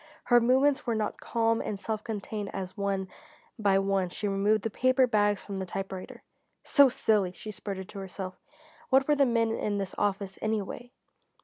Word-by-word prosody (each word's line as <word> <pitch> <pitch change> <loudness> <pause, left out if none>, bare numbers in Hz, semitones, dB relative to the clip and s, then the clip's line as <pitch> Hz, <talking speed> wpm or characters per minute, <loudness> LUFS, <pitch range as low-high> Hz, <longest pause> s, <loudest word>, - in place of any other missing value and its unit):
Her 240 -1 +5
movements 265 +4 +3
were 230 - +1
not 215 -1 -2
calm 230 -1 +1
and 200 - -4
self 215 0 -3
contained 210 -2 -4
as 185 -1 -5
one 200 -2 -1 0.5
by 200 -2 +3
one 195 -2 +1
she 205 - -3
removed 200 +1 +2
the 225 - -2
paper 255 +3 +3
bags 205 -4 +1
from 200 -2 -5
her 190 - -3
typewriter. 190 0 -6 0.4
"So 280 -2 +6
silly!" 210 -6 +1
she 215 - -8
sputtered 195 -2 -6
to 200 - -8
herself. 190 -1 -6 0.6
What 265 0 +4
were 300 - +4
the 280 -2 +4
men 230 -1 +2
in 210 -2 -1
this 195 -2 -3
office, 200 -1 -1
anyway? 220 +2 -3
205 Hz, 180 wpm, -29 LUFS, 195-230 Hz, 0.6 s, So